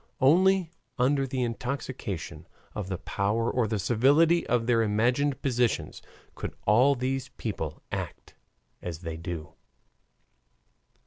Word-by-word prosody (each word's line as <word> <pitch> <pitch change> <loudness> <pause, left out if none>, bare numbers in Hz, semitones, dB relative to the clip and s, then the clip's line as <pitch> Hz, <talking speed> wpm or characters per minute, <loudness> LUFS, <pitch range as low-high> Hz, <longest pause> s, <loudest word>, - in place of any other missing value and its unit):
Only 180 +5 +4 0.3
under 135 +2 +2
the 130 -1 -1
intoxication 120 - -4 0.3
of 105 -3 -4
the 95 - -2
power 105 +5 -1
or 120 -3 +1
the 110 0 -1
servility 145 - +3
of 120 -2 +1
their 115 -1 +3
imagined 120 +6 +1
positions 125 -3 0 0.3
could - - -6
all 125 +7 +5
these 130 +1 -2
people 80 -8 -4
act - - -5 0.5
as 85 -2 -6
they 80 -2 -5
do. 85 -2 -6
120 Hz, 120 wpm, -28 LUFS, 105-135 Hz, 0.5 s, all